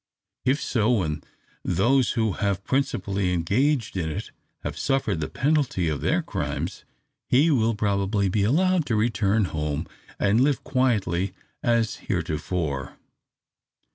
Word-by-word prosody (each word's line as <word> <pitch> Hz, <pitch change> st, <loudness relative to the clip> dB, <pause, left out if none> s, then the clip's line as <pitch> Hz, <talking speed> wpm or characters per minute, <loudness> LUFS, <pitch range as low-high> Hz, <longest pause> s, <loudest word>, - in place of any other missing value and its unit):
If 135 Hz, +3 st, +3 dB
so, 115 Hz, -6 st, +1 dB
when 90 Hz, -10 st, 0 dB, 0.4 s
those 120 Hz, +9 st, +2 dB
who 110 Hz, -3 st, +1 dB
have 100 Hz, 0 st, -1 dB
principally 100 Hz, -8 st, 0 dB
engaged 110 Hz, -, +1 dB
in 85 Hz, -4 st, -1 dB
it 75 Hz, -, -5 dB, 0.3 s
have -, -, -4 dB
suffered 135 Hz, -, 0 dB
the 75 Hz, -, -3 dB
penalty 135 Hz, -, +1 dB
of 75 Hz, -2 st, -2 dB
their -, -, +1 dB
crimes, -, -, -4 dB, 0.4 s
he 145 Hz, +6 st, +4 dB
will 115 Hz, -5 st, +2 dB
probably 100 Hz, -1 st, +1 dB
be 100 Hz, +3 st, +1 dB
allowed 165 Hz, -, +2 dB
to 115 Hz, -, +1 dB
return 110 Hz, -1 st, +2 dB
home, 75 Hz, +1 st, -2 dB, 0.3 s
and 105 Hz, +4 st, +3 dB
live 140 Hz, 0 st, +2 dB
quietly 100 Hz, -8 st, +1 dB, 0.3 s
as 115 Hz, -2 st, +1 dB
heretofore. 80 Hz, -, -3 dB
105 Hz, 130 wpm, -25 LUFS, 90-130 Hz, 0.4 s, he